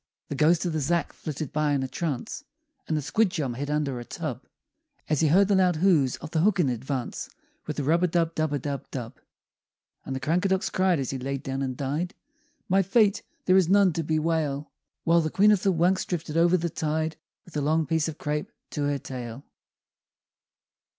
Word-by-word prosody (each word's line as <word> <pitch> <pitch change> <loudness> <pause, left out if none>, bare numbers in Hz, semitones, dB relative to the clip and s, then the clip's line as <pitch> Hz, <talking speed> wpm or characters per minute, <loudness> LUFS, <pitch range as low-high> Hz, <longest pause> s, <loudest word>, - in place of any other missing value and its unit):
The 145 - -3
ghost 160 +5 +3
of 170 - -1
the 155 - 0
Zhack 170 +4 0
flitted 155 -2 -5
by 150 -1 +1
in 135 -2 +1
a - - -2
trance; 150 - -4 0.4
And 155 - 0
the 150 - -2
Squidjum 160 - +1
hid 140 +4 -4
under 145 -4 -1
a - - -6
tub - - -6 0.6
As 150 -2 +1
he 160 - +4
heard 185 +6 +5
the 205 - +2
loud 185 -2 +4
hooves 155 -7 +3
of 160 - -9
the 160 - +1
Hooken 180 -6 +3
advance 130 +1 -4 0.4
With - - -4
a 145 - -1
rub 165 +5 +2
a - - +5
dub 165 -1 +1
dub 155 -2 0
a 145 - +1
dub 140 0 -5
dub! 120 -4 -6 0.8
And 135 - -4
the - - -2
Crankadox 180 +7 +1
cried 185 -2 +2
as 130 - -2
he 135 - -4
laid 135 +1 -3
down 135 0 -3
and 130 -2 -3
died, 150 +8 -2 0.5
"My 195 -1 +4
fate 200 +2 +3 0.2
there 185 0 +5
is 180 -3 +3
none 195 -2 +5
to 165 - -1
bewail!" 155 -2 -1 0.3
While 170 0 +4
the 155 - -1
Queen 205 +6 +5
of 205 -3 +3
the 195 - +3
Wunks 180 +2 +2
drifted 165 -3 -3
over 170 +2 +4
the 170 -1 -2
tide 160 +1 -1 0.3
With 175 - -16
a 150 - 0
long 155 +2 +2
piece 160 0 +1
of 160 -1 -5
crape 150 0 -3 0.2
to 145 - -1
her 145 0 +1
tail. 125 -1 -7
155 Hz, 205 wpm, -26 LUFS, 140-175 Hz, 0.8 s, heard